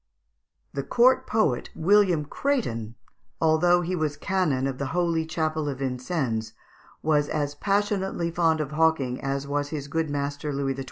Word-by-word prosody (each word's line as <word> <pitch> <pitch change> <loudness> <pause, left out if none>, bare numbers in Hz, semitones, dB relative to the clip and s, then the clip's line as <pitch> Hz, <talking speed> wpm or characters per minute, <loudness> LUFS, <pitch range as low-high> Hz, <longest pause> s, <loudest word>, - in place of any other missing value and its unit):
The 140 - -2
court 255 - +3
poet, 215 - +1
William 180 -3 +3
Crétin, 120 - -2 0.4
although 170 +2 +4
he 180 +2 -2
was 155 -3 -1
Canon 175 -9 0
of 135 -1 -3
the 140 - -2
holy 165 -2 +1
chapel 155 -2 -1
of 135 - -4
Vincennes, 125 -4 -2 0.5
was 150 -2 +2
as 145 -1 -1
passionately 195 0 0
fond 165 -2 +2
of 145 -2 -4
hawking 150 -5 +1
as 135 0 -1 0.3
his 145 -2 -5
good 160 +2 -1
master 145 +1 -3
Louis 135 -1 -1
XII. - - -8
155 Hz, 150 wpm, -26 LUFS, 140-175 Hz, 0.5 s, although